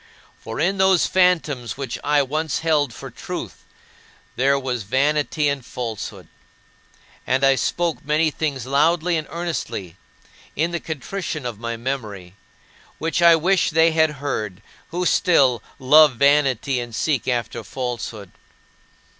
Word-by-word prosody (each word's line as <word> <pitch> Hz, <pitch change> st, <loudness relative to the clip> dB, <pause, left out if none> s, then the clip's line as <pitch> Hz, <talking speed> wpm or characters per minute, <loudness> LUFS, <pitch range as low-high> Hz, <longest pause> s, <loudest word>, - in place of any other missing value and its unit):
For 115 Hz, 0 st, -7 dB
in 190 Hz, +4 st, +1 dB
those 190 Hz, -2 st, +4 dB
phantoms 155 Hz, -10 st, +1 dB
which 135 Hz, -4 st, -5 dB
I 145 Hz, -1 st, +3 dB
once 155 Hz, +3 st, -2 dB
held 150 Hz, -5 st, +1 dB
for -, -, -9 dB
truth -, -, -7 dB, 0.7 s
there 140 Hz, +2 st, +3 dB
was 130 Hz, -3 st, -3 dB
vanity 145 Hz, +6 st, +1 dB
and 140 Hz, -2 st, -1 dB
falsehood. 115 Hz, -4 st, -6 dB, 1.0 s
And 130 Hz, +2 st, +1 dB
I 135 Hz, 0 st, +6 dB
spoke 165 Hz, +3 st, -1 dB
many 155 Hz, +2 st, +1 dB
things 140 Hz, -5 st, -3 dB
loudly 160 Hz, +5 st, +2 dB
and 155 Hz, -2 st, -3 dB
earnestly 160 Hz, -, -4 dB, 0.6 s
in 165 Hz, +4 st, 0 dB
the 170 Hz, -, -2 dB
contrition 160 Hz, -1 st, -5 dB
of 115 Hz, -4 st, -5 dB
my 115 Hz, 0 st, -4 dB
memory 110 Hz, -8 st, -5 dB, 0.6 s
which 165 Hz, +2 st, -1 dB
I 170 Hz, -1 st, +8 dB
wish 180 Hz, +3 st, +2 dB
they 165 Hz, +1 st, +4 dB
had 160 Hz, -1 st, +2 dB
heard, 110 Hz, -9 st, -4 dB, 0.2 s
who 180 Hz, +2 st, -3 dB
still 135 Hz, -, +3 dB, 0.2 s
"love 150 Hz, +1 st, +6 dB
vanity 140 Hz, -1 st, +2 dB
and 120 Hz, -2 st, -6 dB
seek 140 Hz, 0 st, -1 dB
after 120 Hz, -2 st, -2 dB
falsehood." 115 Hz, -6 st, -5 dB
140 Hz, 135 wpm, -22 LUFS, 125-160 Hz, 1.0 s, I